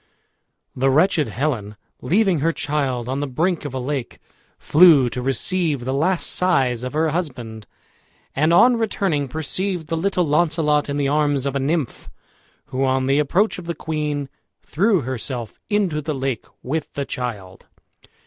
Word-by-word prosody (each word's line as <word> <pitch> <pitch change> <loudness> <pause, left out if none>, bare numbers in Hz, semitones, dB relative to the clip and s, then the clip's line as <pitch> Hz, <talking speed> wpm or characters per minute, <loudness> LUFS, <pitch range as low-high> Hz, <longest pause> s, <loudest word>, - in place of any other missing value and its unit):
The 135 +2 +2
wretched 155 +1 +3
Helen, 110 -4 -2 0.3
leaving 185 - +2
her 165 +4 +2
child 135 -6 -2
on 130 +2 -2
the 145 - -2
brink 165 +5 -1
of 145 - -5
a - - -2
lake, 135 -1 -4 0.4
flew 155 -6 +6
to 125 - -4
receive 140 +1 0
the 130 - -1
last 170 +6 +1
sighs 135 -10 +1
of 125 - -4
her 160 +1 +1
husband, 125 -10 -5 0.7
and 155 +4 +2
on 235 +8 +6
returning 195 -10 0
perceived 160 +4 -3
the 165 - 0
little 180 0 +1
Launcelot 150 -1 +1
in 140 - -2
the 140 -1 +1
arms 145 -2 +1
of 140 0 -2
a - - +1
nymph, 145 -1 -2 0.6
who, 130 +1 -2
on 130 0 +1
the 135 +2 +2
approach 185 +9 +1
of 175 - -10
the 170 0 -3
queen, 150 -3 -3 0.4
threw 195 +1 +2
herself 125 -2 -5
into 195 -7 0
the 150 0 -3
lake 135 -3 -3 0.2
with 150 +4 -3
the 140 - -3
child. 105 -9 -6
145 Hz, 160 wpm, -21 LUFS, 130-170 Hz, 0.7 s, flew